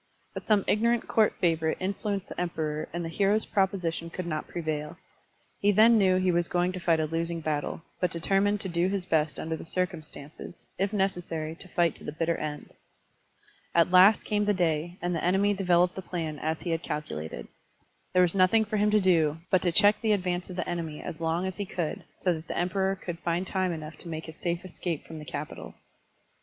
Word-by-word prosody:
But - - -7
some 210 -3 +4
ignorant 235 +2 +2
court 220 -2 +3
favorite 160 -2 +1
influenced 195 +1 -2
the - - -4
Emperor 155 -3 -2
and 170 0 -3
the - - -2
hero's 200 +5 +2
proposition 180 -4 0
could 180 +1 -5
not 155 -3 -3
prevail. 155 -1 -4 0.6
He 205 - +4
then 220 +3 +6
knew 185 -2 +4
he 185 0 +2
was 175 0 +1
going 175 +1 +1
to 185 - -5
fight 165 -2 +2
a 155 - +1
losing 165 +2 -2
battle, 155 0 -2 0.2
but 180 - +1
deter 185 +4 +1
mined 205 0 +1
to - - -2
do 175 0 +1
his 195 -2 -2
best 155 -4 +1
under 160 0 -2
the - - -8
circimistances, 160 -3 -5
if 195 +1 +1
necessary 175 -6 -1
to 170 - -11
fight 170 -3 +2
to - - -13
the - - -4
bitter 165 +2 0
end. 150 -1 -5 1.0
At 170 +1 +4
last 185 +4 +7
came 210 -1 0
the 205 0 +2
day, 170 0 0
and 175 0 0
the 160 - -3
enemy 195 +3 +3
developed 180 -2 +3
the 190 - -6
plan 165 -5 -4
as 160 +1 -2
he 175 - -3
had 165 0 0
calculated. 80 - -5 0.7
There 180 - +6
was 175 - +2
nothing 195 +4 +4
for 215 +1 -2
him 210 +1 +3
to 210 0 +4
do 165 -5 +3
but 185 - +4
to 175 - +1
check 205 +4 +5
the 220 -2 +3
advance 180 -2 -1
of 180 - -6
the 180 - -3
enemy 165 -3 -3
as 155 - -6
long 165 +2 0
as 190 -1 -4
he 205 - -2
cotdd, 170 -5 -3 0.2
so 180 - +1
that 160 0 -7
the - - -4
Emperor 190 +2 +1
could 175 -3 -6
find 175 +1 -1
time 185 -1 0
enough 155 -1 -6
to - - -10
make 160 -1 -5
his 160 - -9
safe 170 +1 -2
escape 170 -3 -4
from 160 -1 -8
the 150 - -9
capital. 150 +1 -6
175 Hz, 215 wpm, -28 LUFS, 160-190 Hz, 1.0 s, last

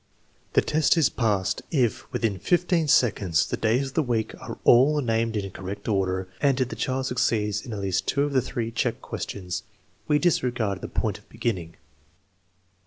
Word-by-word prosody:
The - - +4
test 155 +2 +2
is 160 - +4
passed 105 -6 0
if, 130 -8 0
within 105 -5 -1
fifteen 175 - +2
seconds, 105 - +3
the - - -2
days 125 +5 +1
of - - -15
the 160 - +2
week 120 -6 -1
are - - -7
all 140 +5 +6
named 115 -3 0
in 100 -2 -3
correct 95 +2 -7
order, 95 -3 0
and 140 -2 +3
if 130 -1 +1
the 115 - -5
child 130 +3 -1
succeeds 105 -5 0
in 120 - -8
at 105 -2 -4
least 95 -2 -1
two 140 - +2
of 145 -1 -2
the 130 - +4
three 115 -2 -3
check 115 - -1
questions. 90 -3 -5 0.5
We 150 - +4
disregard 125 - 0
the - - -5
point - - -2
of - - -26
beginning. 90 -8 -3
115 Hz, 180 wpm, -25 LUFS, 100-135 Hz, 0.5 s, all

